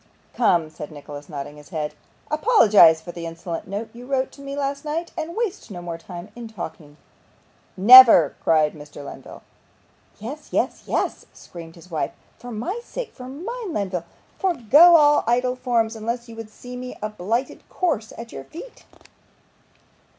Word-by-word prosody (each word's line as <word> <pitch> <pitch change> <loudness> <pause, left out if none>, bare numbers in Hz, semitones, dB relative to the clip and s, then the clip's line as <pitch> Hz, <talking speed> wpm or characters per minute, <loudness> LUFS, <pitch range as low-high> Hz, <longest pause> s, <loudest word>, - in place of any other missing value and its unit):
'Come,' 170 -9 +2
said 150 -1 -9
Nicholas, 145 -1 -10
nodding 145 0 -7
his 150 -1 -15
head, 155 -4 -4 0.4
'apologise 215 - +6
for 165 +2 -9
the 170 -1 -7
insolent 165 +1 -6
note 205 +4 -5
you 245 +1 -11
wrote 265 -1 -1
to 280 - -15
me 275 0 -6
last 280 0 -2
night, 320 +3 -3
and 330 +1 -5
waste 430 - -3
no 185 -4 -7
more 170 -1 -6
time 175 +3 -9
in 240 -1 -8
talking.' 160 -8 -9 0.8
'Never!' 220 - +9
cried 155 -2 +3
Mr. 150 -2 -11
Lenville. - - -11 0.7
'Yes 270 +9 -8
yes - - -1
yes!' - - -2
screamed 165 -2 -12
his 175 +1 -16
wife. 155 - -2 0.3
'For 245 - -10
my 245 - -4
sake - - -7
for 250 -1 -10
mine, 380 - -6
Lenville 185 -4 -3 0.3
forego 335 - +6
all 295 -2 +5
idle 250 +2 +1
forms, 235 -3 0
unless 235 +2 -4
you 230 - -11
would 225 -1 -8
see 245 +3 -11
me 250 0 -7
a 215 - -1
blighted 215 +5 -3
corse 280 - -1
at 230 0 -9
your - - -8
feet. 355 +11 -12
225 Hz, 165 wpm, -23 LUFS, 170-275 Hz, 0.8 s, Never